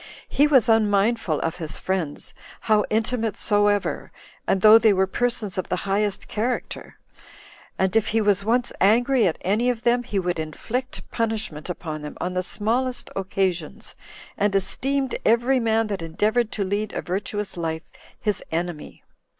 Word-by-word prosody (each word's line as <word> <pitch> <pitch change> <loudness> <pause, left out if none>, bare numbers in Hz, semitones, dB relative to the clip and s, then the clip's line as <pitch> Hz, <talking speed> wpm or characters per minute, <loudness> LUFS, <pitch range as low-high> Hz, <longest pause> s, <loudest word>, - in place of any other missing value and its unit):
He 290 - +4
was 265 -7 +4
unmindful 215 -5 +2
of 165 - -2
his 160 -4 -4
friends, 180 -6 -3 0.3
how 215 -1 +3
intimate 225 0 0
soever, 205 -1 +1 0.4
and 190 - +2
though 215 +2 +9
they 220 -2 +5
were 190 0 +3
persons 220 -2 -1
of 185 - -4
the 180 - +1
highest 200 0 -1
character; 240 +4 -3 0.8
and 190 +2 0
if 220 -1 +3
he 225 - +1
was 205 -2 +2
once 240 +3 +1
angry 235 +3 +4
at 165 - -1
any 215 +6 +1
of 240 -1 -2
them, 240 +1 +3
he 235 -4 -4
would 180 -3 -1
inflict 225 - -4
punishment 215 -9 -2
upon 155 -3 -5
them 150 0 -8
on 180 - -2
the 185 - 0
smallest 240 +7 -1
occasions, 185 -4 -2 0.4
and 205 -1 +2
esteemed 270 +7 0
every 240 +4 +3
man 225 -1 +2
that 200 -4 -4
endeavored 210 +8 0
to 205 - -1
lead 205 +2 -2
a - - -3
virtuous 200 +2 -3
life 160 -1 -3 0.4
his 210 -3 -1
enemy. 165 -1 -4
210 Hz, 160 wpm, -24 LUFS, 185-230 Hz, 0.8 s, though